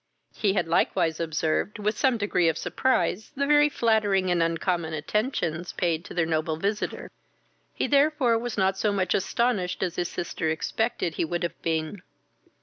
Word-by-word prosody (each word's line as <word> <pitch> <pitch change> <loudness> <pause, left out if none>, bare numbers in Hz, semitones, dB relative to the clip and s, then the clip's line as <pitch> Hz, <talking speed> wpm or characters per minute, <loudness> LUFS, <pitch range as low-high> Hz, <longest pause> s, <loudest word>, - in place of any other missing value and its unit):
He 200 -3 +1
had 195 - 0
likewise 165 -1 +1
observed, 160 +4 -1
with 210 +1 -1
some 260 -1 +2
degree 190 -5 +2
of 160 - -1
surprise, 210 +2 0
the 280 +1 0
very 295 +1 +5
flattering 210 -7 +2
and 175 -1 +2
uncommon 165 0 0
attentions 175 - -2
paid 170 -2 0
to - - -9
their 170 -2 +2
noble 160 0 -1
visitor; 200 +5 -3 0.6
he - - -2
therefore 280 -5 +3
was 240 -1 -5
not 190 0 +1
so 210 - +2
much 190 -3 0
astonished 205 -4 0
as 180 -3 -3
his 175 - 0
sister 165 -2 -3
expected 165 +3 -1
he - - +1
would 175 +2 -3
have 170 - -4
been. 160 +3 -2
185 Hz, 165 wpm, -26 LUFS, 165-220 Hz, 0.6 s, very